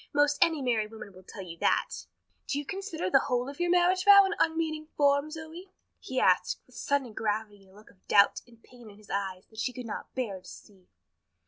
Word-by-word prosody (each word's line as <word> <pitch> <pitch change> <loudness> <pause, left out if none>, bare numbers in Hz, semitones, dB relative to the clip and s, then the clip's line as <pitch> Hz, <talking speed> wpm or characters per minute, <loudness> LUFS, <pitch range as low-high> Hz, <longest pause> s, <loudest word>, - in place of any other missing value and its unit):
Most 290 0 +3
any 320 -4 0
married 225 -4 0
woman 220 -3 -11
will 185 - -14
tell 190 +1 -10
you 170 -2 -10
that." - - 0 0.4
"Do 280 - -1
you 290 - -3
consider 375 - -4
the - - +6
whole 245 0 0
of 280 +2 -9
your 350 0 0
marriage 360 +1 +3
vow 400 0 +8
an 385 - -1
unmeaning 320 -1 0
form, 285 +1 +3
Zoe?" 325 +4 -9 0.3
he - - -3
asked, - - +2
with - - -23
sudden 275 -5 -1
gravity 210 -1 -3
and 195 - -21
a - - -21
look 210 +1 -17
of 190 - -31
doubt 200 0 +4
and 230 -1 -21
pain 240 -3 -15
in 200 - -15
his 210 -1 -14
eyes 190 -2 -3
that 220 - -11
she 250 - -1
could 250 0 -7
not 215 - -7
bear 210 -8 -3
to 180 - -17
see. 190 -3 -15
250 Hz, 225 wpm, -29 LUFS, 205-315 Hz, 0.4 s, vow